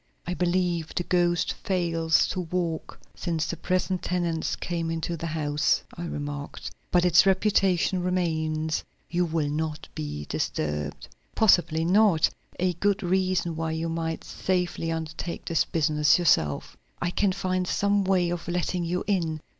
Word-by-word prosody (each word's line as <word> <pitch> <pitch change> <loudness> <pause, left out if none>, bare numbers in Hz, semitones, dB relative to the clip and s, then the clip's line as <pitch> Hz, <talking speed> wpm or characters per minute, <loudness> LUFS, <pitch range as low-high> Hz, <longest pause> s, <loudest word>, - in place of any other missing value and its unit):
"I 180 - -2
believe 175 -2 0
the 175 - 0
ghost 175 -1 +1
fails 165 -4 +1
to 185 - -2
walk 170 -2 -3
since 165 -3 -2
the 170 - -3
present 185 +2 -1
tenants 170 -3 -1
came 170 -2 -3
into 165 +1 -2
the 165 +1 -4
house," 150 -2 +1
I 175 - -5
remarked. 145 -2 -5 0.2
"But 175 0 +3
its 175 +2 +6
reputation 190 -2 +2
remains; 160 -3 0 0.3
you'll 165 -3 +1
not 155 0 -3
be 75 -1 -5
disturbed." 75 -1 -3 0.3
"Possibly 170 -6 +4
not; 190 -2 +4 0.3
a 180 0 +1
good 200 +4 0
reason 185 -2 +1
why 160 0 -2
you 165 +1 -2
might 165 0 -3
safely 180 -3 -1
undertake 160 +1 -4
the 165 - +2
business 150 -1 +3
yourself. 80 - +1 0.2
I 175 - -1
can 200 +1 +2
find 185 -1 -1
some 200 +1 +2
way 185 -2 +2
of 175 -1 -4
letting 175 0 -1
you 175 +2 -1
in." 170 -6 0
170 Hz, 145 wpm, -26 LUFS, 160-180 Hz, 0.3 s, its